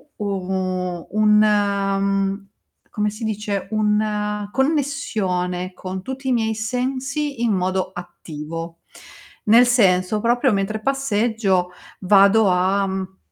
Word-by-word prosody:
u 210 - -5
u 185 -2 -3
un 210 +1 +4
ehm, 200 -1 0 0.4
come 210 0 -1
si 215 +3 -8
dice, 210 -2 -3
una 210 -1 0
connessione 215 - -1
con 185 0 -6
tutti 265 +3 -5
i - - +2
miei 220 -2 0
sensi 260 +4 -3
in 230 - +2
modo 185 0 -1
attivo. 165 -1 -8 0.7
Nel 235 +3 +6
senso: 200 -3 +3
proprio 240 +1 +2
mentre 200 +2 -1
passeggio 220 -8 0 0.3
vado 200 +2 +5
a, 190 +2 +2
mhmm, 190 0 -5
205 Hz, 115 wpm, -21 LUFS, 190-225 Hz, 0.7 s, Nel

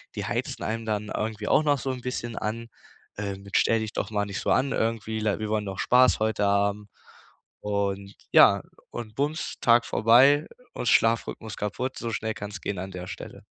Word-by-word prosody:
die - - -3
heizen - - -3
einem 115 +1 -3
dann 105 -1 -2
irgendwie 110 -1 -3
auch 155 - +4
noch 145 -2 +2
so 135 - -4
'n 125 - -6
bisschen 120 -2 -4
an, 115 +2 -3 0.5
ähm, 100 -1 -4
mit: 100 -1 -1
„Stell 115 - +3
dich 110 -1 -5
doch 105 - -3
mal 105 -1 0
nicht 100 -1 -5
so - - -1
an 135 +1 +2
irgendwie, 110 -1 -1
le 105 -1 0
wir 110 -1 -3
wollen 110 -1 0
doch 95 -1 -6
Spaß 125 -1 +4
heute 110 -1 +1
haben.” 100 +1 +1 0.7
Und, 100 -1 -2 0.2
ja - - +7 0.3
und 110 -3 -7
bums, 145 +4 -2
Tag 120 0 +5
vorbei, 135 +7 +5 0.3
und - - -4
Schlafrhythmus 115 -1 +1
kaputt, 110 +6 -3
so 115 -1 -4
schnell 110 0 -2
kann's 105 -2 -7
gehen 100 - -3
an 95 +1 -6
der 90 0 -7
Stelle. - - -9
110 Hz, 195 wpm, -26 LUFS, 100-115 Hz, 0.7 s, ja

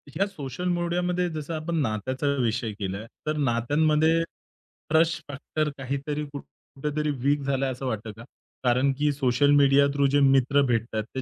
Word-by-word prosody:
या 195 +5 +2
सोशल 165 -2 -5
मीडियामध्ये, 175 +1 0
जसं 155 0 -5
आपण 160 +2 -3
नात्याचा 130 +4 -2
विषय 115 -1 -1
केलाय, 100 +2 -4 0.2
तर 155 0 0
नात्यांमध्ये 150 +5 +2 0.7
ट्रस्ट 160 +1 +3
फॅक्टर 145 +2 -3
काहीतरी 140 +3 -3
कुठ 140 - -6
कुठेतरी 150 +2 -5
वीक 145 +1 +2
झालाय, 135 -1 0
असं 130 +1 -6
वाटतं 110 -3 -3
का? 115 - -10 0.4
कारण, 130 +2 +3
की 150 0 +2
सोशल 135 0 +2
मीडिया 140 0 +5
थ्रू 140 -1 +3
जे 145 - +5
मित्र 135 0 +4
भेटतात, 115 -1 -1
ते 130 - -1
140 Hz, 155 wpm, -26 LUFS, 130-155 Hz, 0.7 s, मीडिया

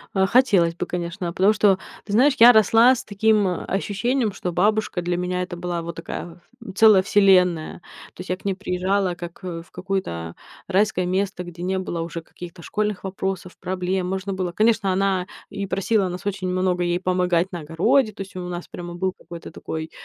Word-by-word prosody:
А 190 0 +3
хотелось 195 -8 +3
бы, 180 - -3
конечно. 175 +1 -4
А - - -7
потому 195 +4 +4
что, 200 -3 +3 0.3
ты 205 - -5
знаешь, 265 +6 +4
я 235 +2 +9
росла 225 +3 +6
с 255 - -4
таким, 210 0 +2
а, 180 -2 -3
ощущением, 210 +5 -1
что 185 -2 -4
бабушка 205 +1 +1
для 175 0 -1
меня- 180 0 -2
это 180 -1 -5
была 175 -1 -3
вот 170 0 -6
такая, 165 +1 -7 0.2
м, 190 -5 -9
целая 215 -2 +7
вселенная. 180 -5 +3 0.3
То - - -24
есть 185 - -10
я 185 - -1
к - - -24
ней 195 - +1
приезжала 185 0 -1
как, 175 0 -9
э, 170 -2 -5
в - - -26
какое-то 85 - -4 0.3
райское 195 -1 +1
место, 185 0 -1
где 175 0 -9
не 190 +1 -1
было 175 -3 -4
уже 165 0 -5
каких-то 170 +1 -11
школьных 210 +2 -2
вопросов, 190 -1 -4
проблем. 185 0 -2
Можно 190 +1 -3
было 185 -2 -2
Конечно, 215 -3 +2
она 190 -1 +1 0.2
и 200 -1 -4
просила 195 +1 +1
нас 180 +2 -7
очень 190 -2 -2
много 180 -1 0
ей 175 0 0
помогать 180 -1 +1
на 175 -3 -5
огороде. 215 - +2
То 200 - -9
есть 195 +1 -9
у 180 -1 -5
нас 175 0 -6
прямо 175 0 -8
был 185 +2 -1
какой-то 170 -1 -10
такой, 160 0 -6
185 Hz, 200 wpm, -23 LUFS, 175-200 Hz, 0.3 s, я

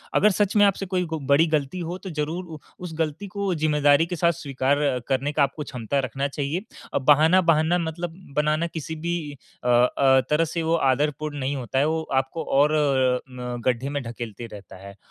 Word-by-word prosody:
अगर 210 +1 +5
सच 205 +1 0
में 205 - +6
आपसे 195 0 +1
कोई 180 -1 -1
को 160 -1 -4
बड़ी 155 +4 +6
गलती 155 +2 -1
हो, 175 +2 -4
तो 190 - -8
ज़रूर 160 +3 -3
उ 160 -2 -9 0.2
उस 175 -3 -6
गलती 160 +5 -2
को 200 -1 -2
ज़िम्मेदारी 150 0 +3
के 180 - -4
साथ 170 0 +3
स्वीकार 140 -2 -1 0.3
करने 135 +2 0
का 145 - +2
आपको 140 +2 -2
क्षमता 130 0 -3
रखना 135 +2 -2
चाहिए। 145 +5 -3 0.3
अ, - - +2
बहाना 155 +7 +5
बहाना 165 0 +3
मतलब 165 +1 -4 0.2
बनाना 155 +3 +1
किसी 160 -1 -6
भी 165 -2 -3 0.3
अ 125 - -3
अ, 130 +2 +4
तरह 155 +2 +3
से 165 +1 -3
वो 165 +1 +2
आदरपूर्ण 145 +1 0
नहीं 135 +1 -2
होता 130 0 -2
है, 145 - +3
वो 160 0 0
आपको 135 +5 -1
और 145 +2 +3
अ, 135 -4 +2
न 125 -1 -6
गड्ढे 130 +2 0
में 145 0 -2
ढकेलते 115 -1 -7
रहता 100 -2 -11
है 100 0 -10
150 Hz, 205 wpm, -24 LUFS, 135-165 Hz, 0.3 s, में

